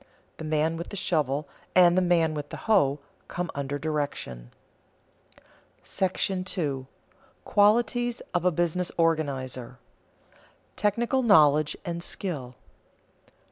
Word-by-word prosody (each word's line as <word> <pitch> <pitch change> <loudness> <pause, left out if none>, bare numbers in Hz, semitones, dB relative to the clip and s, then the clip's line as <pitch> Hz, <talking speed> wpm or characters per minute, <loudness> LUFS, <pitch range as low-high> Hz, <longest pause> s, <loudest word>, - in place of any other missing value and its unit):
The - - -7
man 155 +1 0
with 170 - -6
the - - -7
shovel 150 -6 0 0.3
and 175 -1 +6
the 185 - +4
man 170 -3 +2
with 145 -1 -5
the - - -7
hoe 150 -11 +3 0.3
come 175 -1 -4
under 140 0 -3
direction. 145 - -4 1.4
§ 185 0 -1 0.2
II. - - -15 0.6
QUALITIES 235 +3 +2
OF 175 -1 0
A 180 - +4
BUSINESS 175 +1 -1
ORGANIZER 135 -7 -1
[Sidenote: 125 - -33
Technical 235 +6 +1
knowledge 155 - +4
and 170 -1 -3
skill] 170 -7 -2
1. 125 0 -15
165 Hz, 120 wpm, -27 LUFS, 145-185 Hz, 1.4 s, and